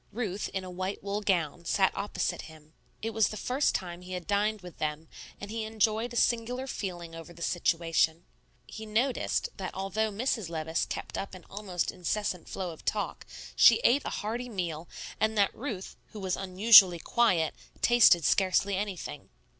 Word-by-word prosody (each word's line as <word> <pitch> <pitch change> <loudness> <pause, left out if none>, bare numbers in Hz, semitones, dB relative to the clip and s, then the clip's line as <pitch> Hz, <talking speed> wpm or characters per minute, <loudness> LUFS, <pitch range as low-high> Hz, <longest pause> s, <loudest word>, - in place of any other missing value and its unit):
Ruth, 210 -3 -3
in 190 -1 -4
a 185 - -7
white 185 +2 -4
wool 200 +1 -2
gown, 175 -5 0
sat 190 +2 +2
opposite 195 -4 -3
him. 155 0 -16 0.3
It 225 - -1
was 220 -1 +3
the 215 - -6
first 260 +7 0
time 175 -1 -4
he 180 0 -8
had 180 -2 -5
dined 210 +1 0
with 180 -2 -12
them; 155 +1 -3 0.3
and 200 +1 -7
he 225 0 -3
enjoyed 220 +2 0
a - - -8
singular 240 +2 +1
feeling 175 -9 -5
over 165 +1 -9
the 170 - -8
situation. 165 -1 +1 0.4
He 220 0 -9
noticed 240 +4 0
that 190 -2 -5
although 195 +3 -1
Mrs. 220 -3 -2
Levice 160 0 -2
kept - - -5
up 195 -1 -6
an 180 - -13
almost 190 -4 -2
incessant 185 0 -3
flow 185 -2 -4
of 160 - -13
talk, - - -3 0.3
she - - +8
ate 275 +4 +4
a - - -3
hearty 235 +4 -4
meal, 170 -6 -4 0.3
and 220 0 +1
that 200 -1 +3
Ruth, 220 -7 -6 0.2
who 215 - -7
was 190 -2 -1
unusually 190 -1 +7
quiet, 175 -4 +2 0.3
tasted 215 -9 +6
scarcely 195 +2 +2
anything. 195 -2 -5
195 Hz, 175 wpm, -29 LUFS, 175-220 Hz, 0.4 s, she